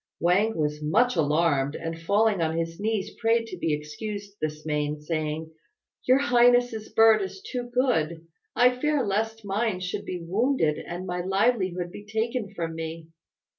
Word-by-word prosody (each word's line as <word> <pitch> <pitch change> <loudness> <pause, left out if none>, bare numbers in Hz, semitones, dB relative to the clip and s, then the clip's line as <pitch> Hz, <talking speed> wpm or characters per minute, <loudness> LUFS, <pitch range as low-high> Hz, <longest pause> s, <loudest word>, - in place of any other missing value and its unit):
Wang 195 +5 +2
was 150 -1 -1
much 220 +11 +2
alarmed, 150 -3 +2
and 165 0 -5
falling 205 +2 +2
on 160 0 0
his 165 +1 -3
knees 215 -1 -1
prayed 230 0 +2
to 185 - -7
be 165 - -1
excused 200 +7 -5
this 155 0 -3
main, 150 -1 -1
saying, 155 0 -3 0.6
"Your 255 +1 +6
highness's 245 -4 +3
bird 225 -1 +5
is 190 - -5
too 250 - -5
good. 170 - 0 0.3
I 250 +1 +5
fear 300 -2 +1
lest 220 +2 -2
mine 200 0 -1
should 180 0 -4
be 180 - -4
wounded, 200 - +1
and 175 +2 -5
my 180 -1 -2
livelihood 190 -3 +1
be 205 - -9
taken 220 +1 -2
from 165 -1 -3
me." 160 0 -6
190 Hz, 160 wpm, -26 LUFS, 160-225 Hz, 0.6 s, Your